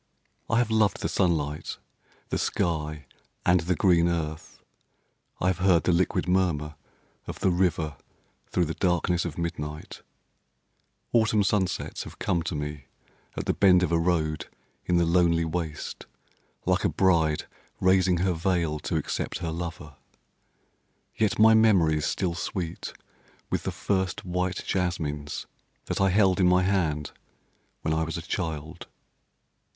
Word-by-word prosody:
I 115 - +2
have 120 -2 +2
loved 110 -4 +2
the - - 0
sunlight, 80 -4 -1 0.5
the - - -1
sky 75 -3 -1 0.4
and 90 +1 +5
the 90 +2 0
green 85 -2 +4
earth; 80 -2 -4 0.8
I - - -1
have 95 -1 +1
heard 90 -3 +4
the - - +2
liquid 90 +1 +1
murmur 85 -5 +1 0.5
of - - -6
the 95 - +3
river 80 -5 0 0.5
through 90 - +1
the 80 - -3
darkness 90 -1 +1
of 80 -3 -5
midnight; 75 -3 -5 1.1
Autumn 110 -3 +3
sunsets 95 -2 -1
have - - -11
come 85 - 0
to 80 - -3
me 75 -2 -5 0.5
at - - -3
the - - +1
bend 90 -2 +5
of 90 - 0
a 85 - +3
road 80 -3 0 0.4
in 90 - +3
the 85 - +3
lonely 85 -1 +3
waste, 80 -2 -4 0.6
like 90 +1 +2
a 100 - +3
bride 80 -2 +2 0.3
raising 95 -1 +3
her 95 - +2
veil 85 -3 0
to 80 - -3
accept 75 - -3
her 85 -2 -4
lover. 80 -3 -6 1.2
Yet 110 -3 +1
my 110 +1 +7
memory 95 -9 +4
is 75 - -1
still 90 -3 -1
sweet 85 -1 -4 0.6
with - - -1
the - - -1
first 95 -3 -1
white 90 0 -2
jasmines 80 -6 -2 0.4
that - - -2
I 95 - +4
held 95 -1 +3
in 90 - +5
my 90 0 +4
hand 80 -6 0 0.7
when 80 - 0
I 80 - +1
was 80 +2 -3
a 85 - -6
child. 80 -2 -4
85 Hz, 145 wpm, -27 LUFS, 80-95 Hz, 1.2 s, my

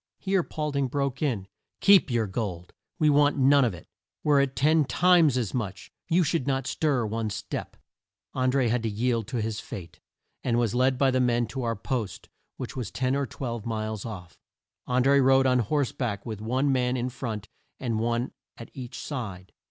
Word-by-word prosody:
Here 195 -1 +1
Paul 150 -2 -3
ding 140 -1 0
broke 140 -1 -2
in, 115 -11 -1 0.3
"Keep 200 -5 +6
your 120 -3 +1
gold! 95 -4 -4 0.2
We 155 - +3
want 145 0 +4
none 140 +1 +5
of 115 -7 0
it. 85 - -13 0.4
Were 145 -2 +4
it 140 -1 -1
ten 155 +2 +4
times 165 -2 +4
as 115 -6 -2
much, 110 -6 -4 0.2
you 175 +2 +4
should 145 -3 -1
not 135 -2 0
stir 135 -5 0
one 110 0 -2
step!" 100 - -5 0.6
An 130 0 +1
dré 130 -2 +2
had 120 +1 +1
to 115 - -1
yield 115 0 0
to 120 -1 -2
his 110 -1 -3
fate, 85 -4 -9 0.4
and 120 -2 +1
was 120 -3 +1
led 130 +1 +2
by 135 0 +3
the 130 - +1
men 120 -1 +2
to 135 +2 -4
our 115 -1 -1
post 110 -2 -4 0.3
which - - -6
was 125 -4 -4
ten 130 +1 0
or 140 -1 -1
twelve 120 -5 -5
miles 110 -2 -3
off. 90 -7 -8 0.5
An 125 0 +2
dré 140 0 +5
rode 135 0 +5
on 125 -1 +4
horse 135 +4 0
back 100 -6 -3
with 110 -3 -5
one 130 +5 +1
man 125 -1 +1
in 125 +1 -1
front, 115 -5 -5 0.3
and 115 -4 -1
one 120 +2 0 0.3
at 115 - -10
each 125 -3 -7
side. 100 -10 -6
125 Hz, 200 wpm, -27 LUFS, 110-140 Hz, 0.6 s, Keep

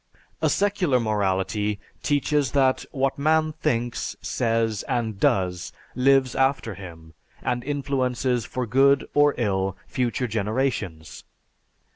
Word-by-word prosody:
A - - +3
secular 190 -10 +2
morality 105 -1 0 0.2
teaches 145 -1 +1
that 135 -2 +2
what 135 0 -1
man 155 +1 +2
thinks, 120 -6 -2
says, 115 -3 0
and 110 -5 -2
does 90 -2 +1 0.2
lives 130 0 +3
after 135 -4 +1
him 85 -4 -11 0.3
and 120 0 -1
influences 130 -3 -1
for 125 +2 -3
good 135 +4 +3
or 145 0 +4
ill 95 -5 0
future 125 -1 -1
generations. 105 - -2
125 Hz, 110 wpm, -24 LUFS, 105-135 Hz, 0.3 s, or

